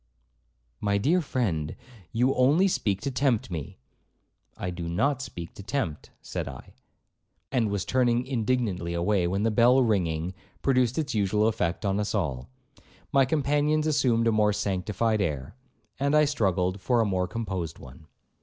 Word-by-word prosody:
'My 100 -1 +1
dear 160 - +2
friend, 95 - -2 0.4
you 125 +4 +2
only 145 +10 +4
speak 100 - 0
to 140 - -2
tempt 130 -6 0
me.' 80 -5 -5 0.8
'I 90 - -3
do 85 -1 -5
not 135 +10 +1
speak 85 -9 -7
to - - -10
tempt,' 95 - -3
said - - -4
I, 65 -3 -10 0.8
and 115 -4 +1
was 100 -2 -2
turning 125 -1 +2
indignantly 115 -9 -1
away, 90 +1 +1
when 100 +3 -1
the 115 - +2
bell 125 +4 +5
ringing, 90 -6 0 0.3
produced 125 -3 +2
its 150 -4 -1
usual 105 0 +2
effect 105 -4 -1
on 100 +1 +1
us 105 +1 -1
all. 70 -11 -2 0.6
My 135 -3 +5
companions 150 +2 +1
assumed 130 -7 +2
a 115 - +4
more 105 -1 +3
sanctified 105 +3 0
air, 75 -6 -3 0.4
and 140 +2 +2
I 150 0 +6
struggled 95 - 0
for 120 +2 +2
a 115 - +3
more 95 -2 0
composed 95 -8 -4
one. 65 +5 -14
105 Hz, 155 wpm, -27 LUFS, 90-130 Hz, 0.8 s, I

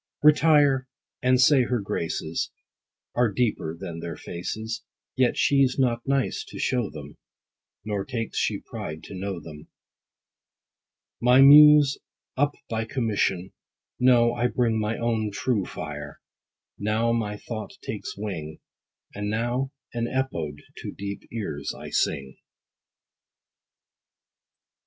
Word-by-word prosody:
Retire, 150 -3 +5 0.3
and 125 0 +3
say 135 +1 +6
her 125 0 0
graces 85 -4 -3 0.6
Are 120 -3 +2
deeper 95 -7 -1
than 85 -4 -6
their 85 0 -5
faces, 110 +6 -5 0.3
Yet 130 -2 +2
she's 135 -2 +3
not 120 -3 +1
nice 135 -1 0
to - - -10
show 125 -5 0
them, 75 -2 -10 0.7
Nor 105 -2 -2
takes 115 -1 -3
she - - 0
pride 80 +1 -7
to - - -10
know 95 -1 -4
them. 75 -2 -11 1.5
My 125 +2 +6
muse 145 0 +8 0.4
up 145 +2 +1
by 110 0 -2
commission; 105 -7 -1 0.5
no, 120 -2 +5
I 120 +1 +1
bring 115 -3 +1
My 110 +1 -1
own 115 -2 0
true 105 -1 0
fire: 75 -2 -7 0.6
now 110 +3 +1
my 105 -3 -2
thought 110 +1 -6
takes - - -5
wing, 80 -7 -5 0.5
And 105 0 -3
now 120 +5 -1 0.2
an 120 -1 -1
EPODE 80 - -3
to - - -6
deep 100 0 -6
ears 90 -11 -4
I - - -9
sing. 70 -2 -1
115 Hz, 120 wpm, -25 LUFS, 95-130 Hz, 1.5 s, muse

